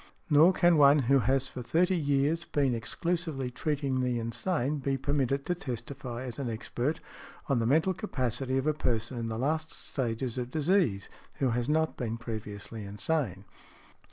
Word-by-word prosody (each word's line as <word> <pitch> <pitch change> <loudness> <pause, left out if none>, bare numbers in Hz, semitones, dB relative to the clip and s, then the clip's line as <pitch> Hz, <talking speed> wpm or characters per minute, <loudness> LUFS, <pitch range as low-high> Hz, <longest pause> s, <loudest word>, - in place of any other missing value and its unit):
Nor 155 +5 +7
can 175 -2 +4
one 145 0 +7 0.2
who 135 - +6
has 130 +3 +1
for 125 - -7
thirty 180 +9 +2
years 145 +1 +1
been 140 -6 +1
exclusively 150 +2 -2
treating 140 -1 -1
the 125 -1 0
insane 125 +5 -1
be 135 0 0
permitted 140 0 0
to 180 - +1
testify, 125 -3 -6
as 125 0 -6
an 130 -4 -2
expert, 120 +6 -2 0.5
on 140 - +2
|113| - - +2
the 115 - +1
mental 160 +8 +3
capacity 130 - -2
of 135 - 0
a 155 - +3
person 120 -4 -1
in 115 - -2
the 110 0 -3
last 155 +5 -1
stages 125 -1 -3
of 125 0 -3
disease, 150 - +1 0.3
who 135 - +1
has 120 +3 -1
not 160 +1 +1
been 115 -2 -3
previously 110 -2 -6
insane. 105 - -2
135 Hz, 170 wpm, -30 LUFS, 120-150 Hz, 0.5 s, Nor